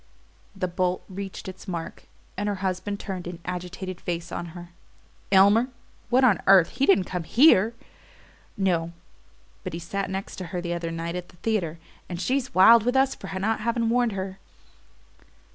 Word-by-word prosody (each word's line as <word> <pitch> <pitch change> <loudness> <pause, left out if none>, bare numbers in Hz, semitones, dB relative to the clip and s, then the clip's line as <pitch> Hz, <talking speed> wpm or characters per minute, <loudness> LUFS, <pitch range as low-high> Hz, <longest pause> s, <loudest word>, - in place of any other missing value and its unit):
The 185 -1 -1
bolt 180 +1 -1
reached 195 0 -7
its 190 +2 -9
mark, 170 -3 -6 0.3
and 205 +2 -2
her 205 - -1
husband 190 +2 -2
turned 185 -3 -5
an 175 -1 -6
agitated 180 +1 -5
face 170 -1 -4
on 170 - -4
her. 175 0 -9 0.6
"Elmer? 200 +5 +6 0.4
What 255 +2 +4
on 230 -7 +4
earth 190 -3 +7
he 275 +2 0
didn't 195 -1 +5
come 180 0 -4
HERE?" 230 - +5 0.8
"No; 170 -4 0 0.7
but - - -5
he 170 - -4
sat 195 +4 -3
next 190 +1 -5
to 185 - -5
her 180 - -4
the 175 0 -3
other 170 -1 -3
night 165 +1 -4
at 180 0 -6
the - - -18
theatre, 175 -5 -1 0.3
and 175 -1 -5
she's 265 +5 -1
wild 225 +5 +8
with 245 +4 0
us 270 0 +3
for 195 - -10
not 220 +4 0
having 230 +1 0
warned 240 -1 +2
her." 190 0 -5
190 Hz, 175 wpm, -25 LUFS, 175-215 Hz, 0.8 s, wild